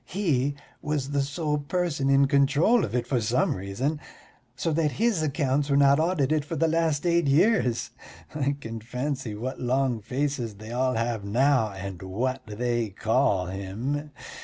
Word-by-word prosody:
He 145 -8 0 0.3
was 145 -2 -2
the 140 -1 +1
sole 150 +2 -1
person 150 -2 -1
in 140 0 +5
control 145 - +3
of 110 - -3
it 120 -1 0
for 125 -1 0
some 120 +5 +1
reason, 100 +11 -2 0.6
so 165 +5 -1
that 150 -2 +1
his 220 -6 +1
accounts 145 -1 0
were 140 - +3
not 140 +1 +5
audited 155 -3 +1
for 160 +3 -5
the 165 +2 +2
last 160 -1 +1
eight 170 -3 +2
years. 140 - +2 0.4
I 140 -2 0
can 115 -3 -6
fancy 125 -1 -4
what 125 +5 -5
long 125 -1 0
faces 125 -1 -2
they 110 +3 -10
all 130 +1 0
have 115 -2 -1
now, 120 +1 +2
and 95 -2 -7
what 125 +8 -2
they 120 +1 -1
call 105 -2 +1
him. 105 +11 -4
135 Hz, 160 wpm, -26 LUFS, 115-150 Hz, 0.6 s, in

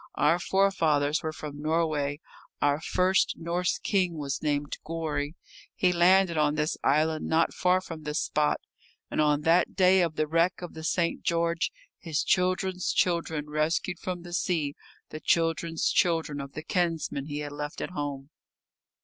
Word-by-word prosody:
Our 165 +4 +3
forefathers 165 -7 +2
were 160 - -3
from 150 -2 -8
Norway, 155 -2 0 0.4
our 145 +1 +2
first 185 +3 +2
Norse 170 +2 -1
king 180 -4 0
was 140 -2 -3
named 145 -1 -1
Gorry. 155 -2 -3 0.4
He 180 -1 +2
landed 175 -1 +4
on 150 0 +2
this 150 +1 0
island, 155 +2 +2
not 160 +1 +2
far 185 0 +2
from 165 -3 -8
this 150 0 -3
spot. 150 0 +1 0.5
And - - +1
on 150 -1 +2
that 165 +3 +3
day 185 0 +5
of 165 -3 0
the 155 - +1
wreck 165 +4 +1
of 175 - -7
the 160 - -8
St. 170 +1 0
George 170 0 0 0.3
his 160 -4 -1
children's 185 0 +1
children 165 -4 0
rescued 155 +3 -1
from 180 -2 -5
the 175 0 -9
sea 160 -5 0 0.3
the 155 - -7
children's 165 -1 +1
children 165 -5 +1
of 140 0 -9
the 155 - -6
kinsmen 165 -6 -1
he 145 -1 -4
had 145 -1 -5
left 150 +2 -5
at - - -4
home. 145 -3 -5
160 Hz, 160 wpm, -28 LUFS, 150-175 Hz, 0.5 s, day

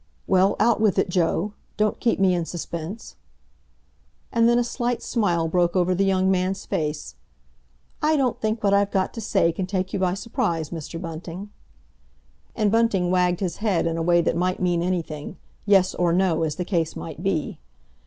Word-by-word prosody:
"Well, 190 +1 +3
out 235 -2 +3
with 210 -4 +3
it, - - +2
Joe! 180 +3 0 0.2
Don't 215 0 +1
keep 230 - +1
me 190 -1 +4
in 175 -1 0
suspense." 170 +4 -6 1.1
And 230 0 +4
then 240 - +4
a 245 - +3
slight 240 0 -2
smile 175 -8 0
broke 175 +1 +1
over 185 0 +2
the 190 +2 +1
young 190 0 +2
man's 190 +1 -1
face. 150 -1 -3 0.9
"I 310 0 +3
don't 260 -4 0
think 215 0 -1
what 200 -1 +3
I've 200 0 +3
got 190 -1 0
to 230 - -6
say 170 -5 +2
can 180 +2 -4
take 185 -1 -2
you - - -1
by 185 -1 +1
surprise, 200 - -2
Mr. 165 0 -6
Bunting." 170 +4 -7 1.0
And 210 -3 +1
Bunting 210 -6 +2
wagged 180 0 +2
his 185 -3 -2
head 205 -7 0
in 165 -1 0
a 165 - -2
way 175 +1 +4
that 165 - 0
might 180 +2 0
mean 175 -2 +1
anything—yes 180 +3 -1
or 175 -1 +1
no, 180 -3 +2
as 155 -2 -1
the 180 - -3
case 170 -4 -1
might 160 0 -7
be. 185 -5 -2
185 Hz, 185 wpm, -24 LUFS, 170-205 Hz, 1.1 s, me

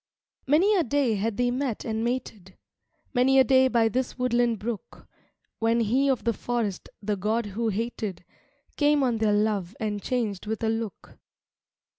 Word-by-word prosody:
VI - - -4
Many 390 +7 +5
a 350 - +3
day 275 -3 +1
had 210 +1 -2
they 245 0 +2
met 255 -3 -2
and 220 0 -2
mated, 225 -6 -4 0.6
Many 265 +1 +4
a 265 - +8
day 260 +1 +5
by 235 -3 +3
this 250 +3 -2
woodland 240 -2 +1
brook, 215 +1 -6 0.5
When 230 +1 +2
he 255 +6 +2
of 265 - 0
the 235 - +1
forest, 220 -4 -3
the 210 +1 0
god 215 +4 -1
who 220 +3 -2
hated, 215 -4 -4 0.5
Came 290 -1 +3
on 240 -3 +1
their 215 -1 +2
love 205 -3 0
and 210 -2 -2
changed 215 -6 -2
with 220 +1 -3
a 220 - +2
look. 225 -2 -5
230 Hz, 170 wpm, -26 LUFS, 210-250 Hz, 0.6 s, a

